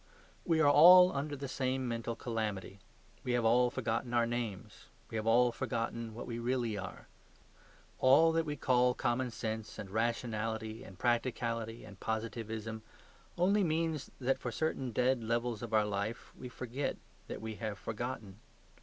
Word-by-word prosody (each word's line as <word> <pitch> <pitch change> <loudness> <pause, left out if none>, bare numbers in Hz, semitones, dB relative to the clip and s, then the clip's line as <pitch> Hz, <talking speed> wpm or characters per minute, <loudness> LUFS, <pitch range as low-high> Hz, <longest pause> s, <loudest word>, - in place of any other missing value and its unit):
We 165 -2 +3
are 145 -2 +6
all 180 +4 +9
under 145 +1 -2
the 140 0 -5
same 130 -1 -1
mental 115 0 -3
calamity; 105 -5 -4 0.4
we 125 - -1
have 120 -2 +1
all 120 +2 +5
forgotten 120 0 -2
our 120 0 +4
names. 115 -4 -5 0.3
We - - -5
have 110 0 -2
all 120 +2 +5
forgotten 115 -2 -3
what 120 - -6
we 120 -1 -4
really 120 -2 -1
are. 95 -2 -7 0.9
All 145 +6 +6
that 165 0 +1
we 150 - -2
call 125 -2 +3
common 125 +1 0
sense 110 -1 -5
and 95 -2 -7
rationality 110 0 -2
and 95 - -12
practicality 115 -1 -1
and 100 -3 -13
positivism 110 0 -4 0.6
only 195 +4 +3
means 160 -3 -1
that 135 +1 +1
for - - -4
certain 145 -5 -1
dead 125 +2 +2
levels 115 0 -1
of 120 -2 -6
our 110 -1 +4
life 105 +2 -4
we 125 - -8
forget 125 +3 -3 0.3
that - - -5
we 110 0 -5
have 105 -1 -4
forgotten. 110 -2 -5
120 Hz, 160 wpm, -33 LUFS, 110-130 Hz, 0.9 s, all